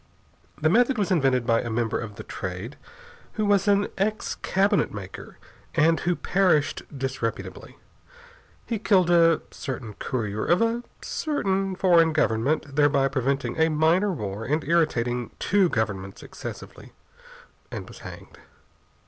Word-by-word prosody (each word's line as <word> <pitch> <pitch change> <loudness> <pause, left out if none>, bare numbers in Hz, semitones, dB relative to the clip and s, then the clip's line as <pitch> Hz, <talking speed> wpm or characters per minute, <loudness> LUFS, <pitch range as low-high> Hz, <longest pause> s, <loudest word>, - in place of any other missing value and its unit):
The 155 - +2
method 245 - +3
was 205 -2 0
invented 135 -8 +2
by 115 -1 +3
a 120 - -5
member 115 0 -1
of 110 -2 -7
The - - -8
Trade 95 +9 -6 0.6
who 215 - -1
was 205 -1 +2
an 200 0 +3
ex 215 +2 -1
cabinet 200 +1 +1
maker, 100 -2 -9 0.4
and 160 +1 +4
who 175 0 0
perished 180 -7 +1 0.2
disreputably. 130 -4 -4 0.9
He 230 -3 -2
killed 185 -5 +3
a 165 -2 +5
certain 125 -5 -6
courier 110 -2 -3
of 175 - +3
a 230 +1 +1 0.2
certain 195 - -1
foreign 170 -4 +4
government, 145 +1 0
thereby 145 -2 +3
preventing 135 0 -1
a 160 0 +4
minor 165 +6 +2
war 105 - -4
and 150 +6 -1
irritating 125 -7 +1
two 195 -2 +2
governments 100 -5 -3
excessively, - - -9 0.8
and - - -7
was - - -12
hanged. - - -11
155 Hz, 135 wpm, -25 LUFS, 120-190 Hz, 0.9 s, a